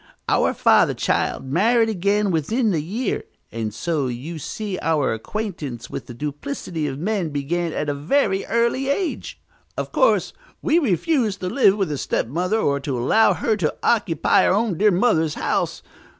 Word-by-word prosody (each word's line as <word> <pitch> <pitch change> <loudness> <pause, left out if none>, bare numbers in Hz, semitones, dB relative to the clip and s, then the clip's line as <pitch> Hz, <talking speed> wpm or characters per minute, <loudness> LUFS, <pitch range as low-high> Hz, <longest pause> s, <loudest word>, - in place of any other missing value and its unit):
Our - - +2
father, - - +4
child, - - -1
married 225 - +3
again 205 0 +1
within 215 - +1
the 160 -5 0
year, 205 +9 -2 0.3
and 110 -1 -3
so 145 +5 -2
you 135 +7 -5
see 200 +4 -5
our 155 -7 +1
acquaintance 145 - -5
with - - -6
the 120 - -9
duplicity 150 - -4
of 135 -1 -4
men 185 0 -1
began 160 +4 -2
at 150 - -3
a 145 - 0
very 195 - +1
early 235 +4 +1
age. 335 +4 -2 0.4
Of - - -3
course, - - +2 0.3
we 320 +2 +2
refused 230 - 0
to 180 - -2
live 205 -4 +4
with 195 -6 -1
a 145 - -3
stepmother 180 - -1
or 140 -9 +1
to 135 -2 -3
allow 175 - +4
her 225 - 0
to 160 -7 -1
occupy 185 -9 +3
our - - +3
own 215 -3 0
dear 210 - +5
mother's 175 -6 +2
house. - - -1
180 Hz, 165 wpm, -22 LUFS, 145-220 Hz, 0.4 s, dear